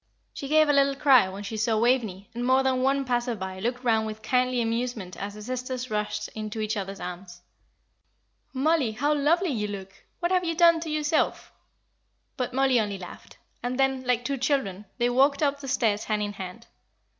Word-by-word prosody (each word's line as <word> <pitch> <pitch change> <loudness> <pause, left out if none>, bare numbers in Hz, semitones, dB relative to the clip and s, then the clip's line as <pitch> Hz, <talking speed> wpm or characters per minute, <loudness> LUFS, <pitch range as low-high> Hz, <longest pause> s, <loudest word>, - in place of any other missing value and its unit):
She 275 - -6
gave 310 +1 +4
a 290 - +3
little 275 0 +3
cry 270 -8 +5
when 195 +2 -7
she 205 +2 -5
saw 220 +1 +1
Waveney, 220 -5 0
and 240 +1 -4
more 260 +2 +3
than 260 -1 +1
one 275 +1 +1
passer 240 -1 0
by 190 -2 -6
looked 245 +5 -2
round 220 -2 +2
with 215 0 -7
kindly 250 +1 +1
amusement 230 -5 -2
as 200 +1 -6
the 210 - -9
sisters 255 +1 -4
rushed 210 0 -2
into 215 0 -6
each 215 +1 -1
other's 195 -1 -5
arms. 180 0 -8 1.1
"Oh, 270 - -12
Mollie, 300 -7 +2
how 290 +7 +1
lovely 320 +5 +2
you 210 -5 -1
look! 195 -2 -7 0.3
What 345 0 -1
have 365 -1 +3
you 335 -1 -1
done 335 0 +6
to 325 0 -5
yourself?" 305 0 0 0.8
But 250 -1 -2
Mollie 265 -1 +3
only 205 -2 -2
laughed. 180 -2 -11 0.2
And 250 +2 -3
then, 265 -1 +2
like 245 -1 0
two 280 -1 -1
children, 245 -8 -1
they 240 -1 +2
walked 280 +4 +3
up 285 -1 +1
the 275 - -8
stairs 225 -6 +1
hand 210 -1 0
in 205 0 -3
hand. 195 +3 -8
245 Hz, 200 wpm, -26 LUFS, 210-275 Hz, 1.1 s, done